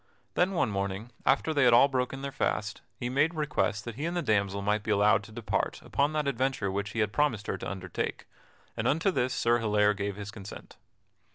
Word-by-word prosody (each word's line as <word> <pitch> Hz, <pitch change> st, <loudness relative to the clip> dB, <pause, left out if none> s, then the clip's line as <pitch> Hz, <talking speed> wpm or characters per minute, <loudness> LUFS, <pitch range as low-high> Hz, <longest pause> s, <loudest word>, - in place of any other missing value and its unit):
Then 185 Hz, +2 st, +2 dB
one 170 Hz, -, +1 dB
morning, 100 Hz, +3 st, -3 dB, 0.2 s
after 140 Hz, +4 st, +3 dB
they 140 Hz, -2 st, +3 dB
had 120 Hz, -1 st, +6 dB
all 120 Hz, +4 st, +7 dB
broken 135 Hz, 0 st, -2 dB
their 140 Hz, -, -3 dB
fast, 110 Hz, -6 st, -2 dB
he 120 Hz, -, -4 dB
made 145 Hz, +7 st, +1 dB
request 130 Hz, -8 st, -1 dB
that 120 Hz, -, -5 dB
he 145 Hz, +8 st, -4 dB
and 170 Hz, +1 st, -2 dB
the 175 Hz, -, 0 dB
damsel 100 Hz, -2 st, +1 dB
might 105 Hz, +1 st, +1 dB
be 110 Hz, -, -7 dB
allowed 105 Hz, -1 st, +4 dB
to 110 Hz, -, -13 dB
depart 110 Hz, -1 st, -2 dB
upon 140 Hz, +2 st, +1 dB
that 150 Hz, -2 st, 0 dB
adventure 130 Hz, -6 st, 0 dB
which 100 Hz, +1 st, -3 dB
he 115 Hz, -, 0 dB
had 105 Hz, -1 st, 0 dB
promised 120 Hz, -8 st, +1 dB
her 95 Hz, -, -2 dB
to -, -, -4 dB
undertake, 90 Hz, -2 st, -4 dB, 0.5 s
and -, -, -1 dB
unto 165 Hz, +7 st, +2 dB
this 130 Hz, -6 st, 0 dB
Sir 120 Hz, -1 st, +2 dB
Hilaire 105 Hz, -2 st, +3 dB
gave 100 Hz, -1 st, -3 dB
his 105 Hz, +1 st, -7 dB
consent. 105 Hz, -3 st, -10 dB
115 Hz, 215 wpm, -29 LUFS, 105-140 Hz, 0.5 s, all